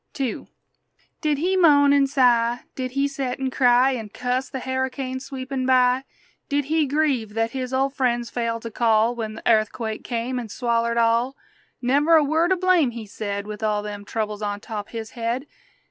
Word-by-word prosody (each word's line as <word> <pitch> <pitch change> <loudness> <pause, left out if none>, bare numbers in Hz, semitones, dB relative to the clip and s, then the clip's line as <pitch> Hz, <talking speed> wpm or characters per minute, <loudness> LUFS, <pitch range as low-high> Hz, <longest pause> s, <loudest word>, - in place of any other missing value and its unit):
II 260 -4 -3 0.7
Did 300 -3 +1
he 360 +6 +1
moan 290 -6 +5
an' 280 -1 +4
sigh? 245 -3 +3
Did 255 -1 -4
he 275 +1 +1
set 270 -3 -4
an' 265 -1 -2
cry 250 +1 +4
An' 225 -5 -4
cuss 250 +4 -2
the - - -5
harricane 260 0 -3
sweepin' 260 0 -4
by? 255 0 +3 0.4
Did 285 -1 0
he 310 0 +1
grieve 270 -7 0
that 225 0 0
his 255 -1 -4
ol' 270 +1 +1
friends 240 -3 -1
failed 230 -1 -2
to 230 - -6
call 225 0 +2
When 220 -2 -5
the - - -10
airthquake 220 0 +1
come 245 +1 -2
an' 235 - -6
swallered 235 0 0
all? 235 +4 +2 0.5
Never 290 +6 +4
a 315 - +6
word 320 +5 +1
o' - - +5
blame 360 -6 +3
he 230 -2 -7
said, 200 0 -4
With 210 0 -7
all 210 -1 0
them 205 -1 -6
troubles 215 0 -3
on 205 -1 -2
top 210 -1 -6
his 225 -1 -6
head! 235 +3 -3
250 Hz, 185 wpm, -23 LUFS, 230-270 Hz, 0.7 s, a